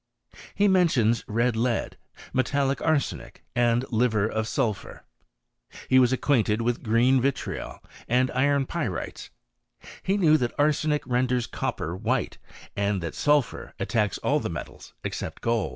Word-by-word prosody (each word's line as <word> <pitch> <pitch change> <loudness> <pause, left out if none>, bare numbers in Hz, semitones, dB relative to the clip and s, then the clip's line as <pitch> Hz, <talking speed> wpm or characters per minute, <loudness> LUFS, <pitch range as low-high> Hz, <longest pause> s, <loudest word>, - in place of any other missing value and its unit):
He 205 +1 +3
mentions 135 - +3
red 115 +2 +1
lead, 115 +1 -1 0.4
metallic 135 +1 0
arsenic, 155 -4 -1
and 120 0 +2
Hver 110 -3 +2
of 110 0 -2
*id{^ur. 115 -6 -2 0.9
He 130 - +6
was 125 -1 +4
acquainted 120 -5 +1
with 120 0 -1
green 120 +3 +3
vitriol 140 +1 -3 0.2
and 125 +2 +2
^n 140 +1 +2
p^ites. - - -4 0.7
He 195 +2 0
knew 155 -5 +5
that 120 -4 -2
arsenic 150 0 +1
renders 125 -1 +1
copper 80 +3 -3
^hite, - - -1 0.4
and 100 -2 0
that 85 - -4
sulphur 145 -4 0
attacks 105 -3 0
all - - +1
the - - -3
metals - - -8
except - - -5
X)W. 115 -6 +1
125 Hz, 135 wpm, -26 LUFS, 115-140 Hz, 0.9 s, He